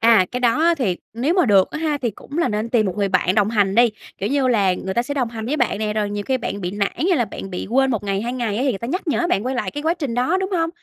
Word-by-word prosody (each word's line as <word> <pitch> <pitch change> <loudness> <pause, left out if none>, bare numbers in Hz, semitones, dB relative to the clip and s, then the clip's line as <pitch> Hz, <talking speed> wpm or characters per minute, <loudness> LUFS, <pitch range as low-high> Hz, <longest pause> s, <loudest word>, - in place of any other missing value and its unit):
À, 225 -4 +5
cái 250 - -2
đó 245 +3 +2
á 340 +1 +4
thì 195 -10 0 0.2
nếu 255 +9 0
mà 365 -4 +3
được 195 -4 +4
á - - -4
ha, 310 -2 0
thì 240 -5 -2
cũng 280 - -9
là 340 - +2
nên 215 +2 -2
tìm 230 -3 +2
một 185 -1 -3
người 200 -1 +1
bạn 185 0 +2
đồng 210 -1 +3
hành 200 -3 +1
đi, 240 +1 +6 0.3
kiểu 200 - -2
như 275 -2 +2
là, 205 -7 +3
người 190 +1 -4
ta 235 - +1
sẽ 285 +3 -4
đồng 255 -5 -1
hành 225 -1 -6
với 285 +6 -1
bạn 245 -6 +1
nè, 210 0 -2
rồi 210 -1 -1
nhiều 205 0 -3
khi 260 -1 +2
bạn 205 -4 -4
bị 180 - -3
nản 200 0 -1 0.2
hay 355 - +3
là 240 - +1
bạn 195 -1 -8
bị 180 - -5
quên 265 +3 +3
1 220 -4 -2
ngày, 195 -1 -1
2 240 +2 -3
ngày 235 -5 -2
á, 245 - 0
thì 275 - +2
người 225 - -1
ta 235 - -6
nhắc 360 +5 -3
nhở 335 +3 +1
bạn 200 - +1
quay 260 +1 -1
lại 210 -6 -2
cái 290 - -5
quá 325 +1 +2
trình 285 -9 -4
đó, 255 +10 +1
đúng 380 +1 -2
hông? 330 -3 +1
235 Hz, 345 wpm, -21 LUFS, 205-275 Hz, 0.3 s, đi